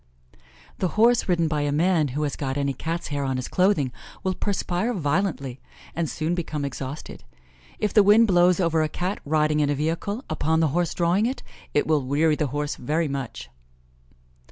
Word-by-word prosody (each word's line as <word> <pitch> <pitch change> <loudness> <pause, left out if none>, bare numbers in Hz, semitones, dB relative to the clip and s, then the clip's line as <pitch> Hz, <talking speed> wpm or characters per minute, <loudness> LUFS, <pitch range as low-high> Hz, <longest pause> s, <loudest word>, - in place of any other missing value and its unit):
The 185 - +1
horse 235 -1 +4
ridden 170 -2 +2
by 150 -1 -1
a 145 0 0
man 160 +1 +2
who 145 +3 -3
has 145 - -2
got 135 -1 -3
any 140 -1 0
Cat's 165 +6 -4
hair 145 -1 -2
on 135 -1 -1
his 130 - -4
clothing 180 -9 +2 0.3
will 190 -1 0
perspire 200 +4 -1
violently, 145 -5 -1 0.3
and 165 -2 -1
soon 160 +2 -2
become 155 -4 -3
exhausted. 135 - -6 0.5
If 210 - -1
the 215 - +7
wind 210 +3 +6
blows 180 -2 +4
over 165 -3 +2
a 155 - 0
Cat 180 +6 -3
riding 150 0 +2
in 145 -1 +2
a 145 - +1
vehicle, 165 - -2
upon 160 +1 0
the 160 -2 +3
horse 175 +3 -1
drawing 180 +6 +2
it, 260 - -4 0.3
it 145 - +3
will 155 -2 +2
weary 150 +4 +2
the 150 -1 -1
horse 145 +2 -3
very 155 +5 -1
much. 135 - -5
155 Hz, 185 wpm, -24 LUFS, 145-180 Hz, 0.5 s, the